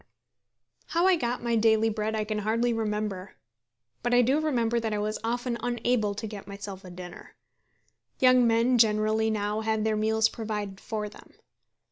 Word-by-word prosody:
How 340 +2 +1
I 380 -1 +6
got 245 -6 -2
my 235 -1 +1
daily 220 0 +3
bread 215 +1 -2
I 215 - 0
can 210 0 -3
hardly 230 +3 +1
remember. 210 -3 -3 0.7
But 245 0 +1
I 245 - +6
do 265 +5 +2
remember 240 -7 +1
that 220 -2 -2
I - - -1
was 210 +1 -2
often 240 +1 -2
unable 240 -3 0
to 220 - -5
get 205 -2 -8
myself 200 -1 -8
a 185 - -10
dinner. 180 0 -10 0.8
Young 255 -1 +5
men 235 +2 +3
generally 215 0 +3
now 210 0 -1
have 220 -1 0
their 220 0 +1
meals 220 +1 +2
provided 210 -4 -5
for 215 -1 -4
them. - - -15
220 Hz, 170 wpm, -27 LUFS, 210-235 Hz, 0.8 s, I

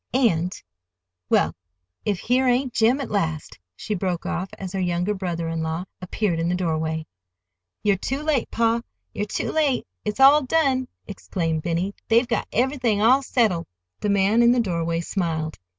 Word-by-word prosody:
And—Well, 90 - -1 0.5
if 205 -3 +1
here 255 +2 +2
ain't 250 0 +1
Jim 240 +4 +3
at 270 - -5
last," 160 - -2 0.2
she 210 - -4
broke 180 -3 -2
off, 185 +2 -2
as 190 -1 -6
her 195 - -2
younger 180 +2 0
brother 175 -4 -3
in 165 0 -2
law 160 +3 -2 0.2
appeared 180 -1 -1
in 165 +1 0
the 180 - +1
doorway. 160 -2 -1 0.8
"You're 205 -2 +3
too 270 +9 -3
late, 305 -6 0
pa, 230 0 +1 0.3
you're 205 - -2
too - - -2
late! 295 -5 +1 0.2
It's 210 - -3
all 280 +3 +8
done," 270 -2 +1 0.4
clamored 165 -4 0
Benny. 175 +4 -1
"They've 235 +2 +4
got 235 -3 -1
everything 245 -4 +1
all 250 +6 +5
settled." 220 -10 +1 0.3
The 210 - -1
man 200 +3 +3
in 235 0 +6
the 250 - +2
doorway 170 -5 -1
smiled. 165 -4 -2
195 Hz, 165 wpm, -23 LUFS, 165-245 Hz, 0.8 s, all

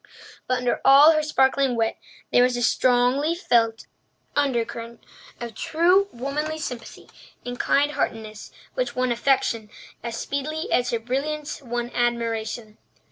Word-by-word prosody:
But 255 - +1
under 250 -1 -1
all 280 +4 +8
her 310 -1 +2
sparkling 270 -3 +2
wit 225 -1 0 0.3
there - - +5
was 250 0 +3
a 240 - -1
strongly 255 +7 +2
felt 230 - +1 0.5
undercurrent 235 -4 -2 0.4
of 235 -1 -6
true 360 - +2
womanly 295 +5 -3
sympathy 250 -6 -7 0.4
and 245 0 -6
kind 290 +1 +2
heartedness 215 -6 -4 0.2
which - - -2
won 255 0 0
affection 235 -3 +1 0.3
as 230 0 -5
speedily 305 +3 -3
as 245 0 +2
her 235 - 0
brilliance 285 +7 -3
won 240 -1 -4
admiration. 230 -2 -2
250 Hz, 135 wpm, -24 LUFS, 235-290 Hz, 0.5 s, all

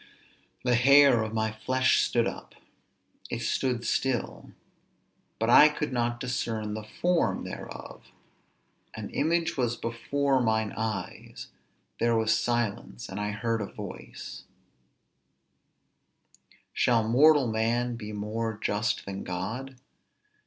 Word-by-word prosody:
The 125 -1 +2
hair 135 0 +6
of 110 -1 -3
my 110 -1 -1
flesh 130 +4 +2
stood - - +1
up. - - -6 0.7
It - - -3
stood 125 -3 0
still_, 120 - -2 0.8
but 115 - -1
I 150 +5 +8
could 150 -2 -4
not 120 -1 -1
discern 110 -4 -3
the 110 - -4 0.2
form 175 -1 +1
thereof; - - -9 0.9
_an - - -6
image 165 +2 0
was 120 -2 0
before 135 +4 0
mine 110 -2 0
eyes; 110 -4 -5 0.5
there 115 0 +2
was 110 0 +2
silence; 120 - -2
and 95 - -5
I 105 0 -2
heard 110 +2 -1
a 100 - -3
voice, - - -9 2.3
Shall 115 -3 +2
mortal 145 +4 +5
man 120 +2 0
be 105 -2 -7
more 105 +1 -3
just 105 0 -1
than 95 0 -5
God? 115 +9 -5
115 Hz, 115 wpm, -28 LUFS, 110-130 Hz, 2.3 s, I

